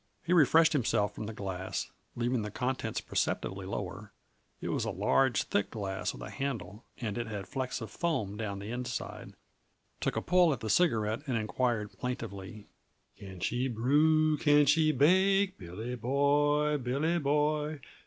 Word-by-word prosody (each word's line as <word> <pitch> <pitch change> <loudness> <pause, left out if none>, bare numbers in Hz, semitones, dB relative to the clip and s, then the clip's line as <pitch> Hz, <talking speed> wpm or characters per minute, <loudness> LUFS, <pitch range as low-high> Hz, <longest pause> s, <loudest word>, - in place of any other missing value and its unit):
He 170 - +1
refreshed 160 0 +5
himself 110 -7 +1
from 110 - -6
the - - -4
glass, 95 -2 -4 0.2
leaving 120 0 0
the 105 - -4
contents 130 +5 -2
perceptibly 95 0 -2
lower 100 +2 -5 0.5
it - - -4
was - - 0
a - - -2
large, 130 -3 +2
thick 100 - 0
glass 95 -4 -3
with - - -9
a - - -7
handle, 125 -6 -4
and 110 -2 -3
it 120 - -3
had 100 -2 -5
flecks 130 -3 -3
of 110 -2 -6
foam 130 - -1
down 105 -2 -4
the 100 +3 -6
inside 125 +1 -5 0.6
took - - -1
a - - 0
pull 180 -3 +4
at 130 - -5
the 110 -2 -1
cigarette 110 - +2
and 125 -3 0
inquired 110 -1 -1
plaintively: 105 -4 -5 0.5
"Can 95 -3 -10
she 125 +2 0
brew, 150 +6 +3
can 145 -1 +5
she 155 +2 +4
bake, 190 +7 +3
Billy 100 +7 -6
boy, 145 +4 +2
Billy 140 +7 0
boy? 150 +1 0
125 Hz, 160 wpm, -31 LUFS, 105-150 Hz, 0.6 s, refreshed